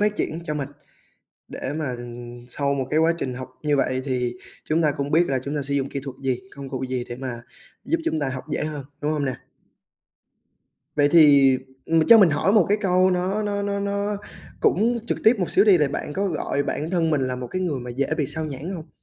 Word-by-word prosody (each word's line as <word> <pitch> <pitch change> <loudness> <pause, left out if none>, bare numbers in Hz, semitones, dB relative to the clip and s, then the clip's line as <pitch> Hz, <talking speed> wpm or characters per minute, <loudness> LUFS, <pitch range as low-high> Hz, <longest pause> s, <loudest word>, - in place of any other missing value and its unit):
phát 210 0 +1
triển 160 - -2
cho 150 -3 -3
mình, 140 -2 -3 0.8
để 130 - -5
mà 140 -6 -3 0.5
sau 140 +2 -1
một 135 -2 -2
cái 155 - +2
quá 165 +1 +4
trình 130 -5 -3
học 130 0 -7
như 150 -2 +2
vậy 130 -1 +1
thì 125 -3 -1 0.3
chúng 160 +2 +1
ta 150 -2 +3
cũng 140 +1 -3
biết 170 +3 +4
là 135 -1 +1
chúng 145 +2 -3
ta 145 - -1
sử 140 +1 -2
dụng 140 -1 0
kỹ 140 - -4
thuật 135 -2 -7
gì, 130 -2 0 0.2
công 140 -1 -7
cụ 130 0 -4
gì 125 -1 -2
để 120 - -5
mà 125 -2 -5 0.4
giúp 330 - +1
chúng 160 - 0
ta 140 - 0
học 130 -1 -5
dễ - - -1
hơn, 150 -3 -5 0.2
đúng 150 +1 0
hông 150 -2 -1
nè? 130 -2 -1 1.6
Vậy 145 -1 +4
thì, 140 -5 +7 0.3
ừm, 160 -1 +2
cho 230 - +9
mình 190 -6 +6
hỏi 145 +7 +2
một 210 -6 +5
cái 205 +2 +3
câu 185 -1 +3
nó 185 +4 0
nó 205 -1 -1
nó 200 0 -1
nó 200 +1 -1 0.4
cũng 235 +5 +2
trực - - -1
tiếp 225 +3 +6
một 180 - 0
xíu 195 - +5
đi 200 -4 +6
là 150 -2 +3
bạn 145 - -4
có 200 +5 -1
gọi 150 -4 -1
bản 155 +3 -3
thân 170 -3 +1
mình 145 -3 +2
là 130 -1 -1
một 125 0 -5
cái 185 +9 -3
người 160 -7 -1
mà 125 0 -7
dễ 135 +3 -1
bị 145 -4 0
sao 160 +3 -1
nhãng 145 +1 -6
hông? 165 -4 -7
150 Hz, 245 wpm, -23 LUFS, 135-180 Hz, 1.6 s, cho